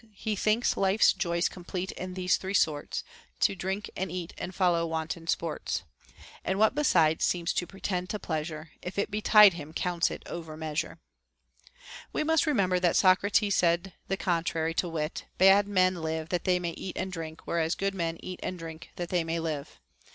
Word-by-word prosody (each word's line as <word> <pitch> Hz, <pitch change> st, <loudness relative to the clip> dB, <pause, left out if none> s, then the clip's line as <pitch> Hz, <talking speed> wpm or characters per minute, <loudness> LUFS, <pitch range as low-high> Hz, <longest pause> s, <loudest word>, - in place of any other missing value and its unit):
He 215 Hz, +1 st, -2 dB
thinks 215 Hz, +4 st, +2 dB
life's 195 Hz, +2 st, +4 dB
joys 170 Hz, -2 st, 0 dB
complete 180 Hz, +1 st, -5 dB
in 185 Hz, 0 st, -6 dB
these 185 Hz, -1 st, +2 dB
three 190 Hz, +1 st, -4 dB
sorts, 150 Hz, -5 st, +1 dB, 0.4 s
To -, -, +4 dB
drink 190 Hz, +2 st, -3 dB
and 190 Hz, -2 st, -3 dB
eat, 180 Hz, -1 st, -5 dB
and 185 Hz, -, -6 dB
follow 175 Hz, -3 st, +2 dB
wanton 165 Hz, +1 st, -4 dB
sports; 165 Hz, -1 st, -2 dB, 0.6 s
And 190 Hz, -, -1 dB
what 220 Hz, +3 st, +4 dB
besides 170 Hz, -, +3 dB
seems 170 Hz, -2 st, +1 dB
to 175 Hz, -, -1 dB
pretend 185 Hz, -2 st, -3 dB
to 210 Hz, -, -2 dB
pleasure, 155 Hz, -3 st, -4 dB
If 180 Hz, -, -7 dB
it 200 Hz, -, 0 dB
betide 210 Hz, -1 st, +7 dB
him, 155 Hz, -2 st, -8 dB
counts 175 Hz, -1 st, +1 dB
it -, -, -7 dB
over 160 Hz, -2 st, -7 dB
measure, 155 Hz, -1 st, -3 dB, 1.1 s
we -, -, 0 dB
must 320 Hz, 0 st, +2 dB
remember 190 Hz, -10 st, +2 dB
that 175 Hz, -1 st, +2 dB
Socrates 200 Hz, +2 st, +4 dB
said 170 Hz, +2 st, +2 dB
the 195 Hz, -, -1 dB
contrary, 165 Hz, -3 st, 0 dB
to 175 Hz, +1 st, 0 dB
wit: 155 Hz, -1 st, -3 dB
Bad 195 Hz, +2 st, +6 dB
men 185 Hz, -2 st, +3 dB
live 160 Hz, 0 st, -3 dB
that 180 Hz, -3 st, -1 dB
they 180 Hz, -1 st, +3 dB
may 175 Hz, -1 st, -2 dB
eat 185 Hz, +2 st, -7 dB
and 190 Hz, -, -2 dB
drink, 160 Hz, -2 st, -7 dB
whereas 165 Hz, 0 st, 0 dB
good 195 Hz, 0 st, -1 dB
men 165 Hz, -3 st, -2 dB
eat 185 Hz, -1 st, -7 dB
and 185 Hz, -, -4 dB
drink 165 Hz, -1 st, -9 dB
that 175 Hz, -1 st, -4 dB
they 175 Hz, -2 st, +1 dB
may 165 Hz, +1 st, -2 dB
live. 150 Hz, -, -4 dB
180 Hz, 185 wpm, -29 LUFS, 165-195 Hz, 1.1 s, betide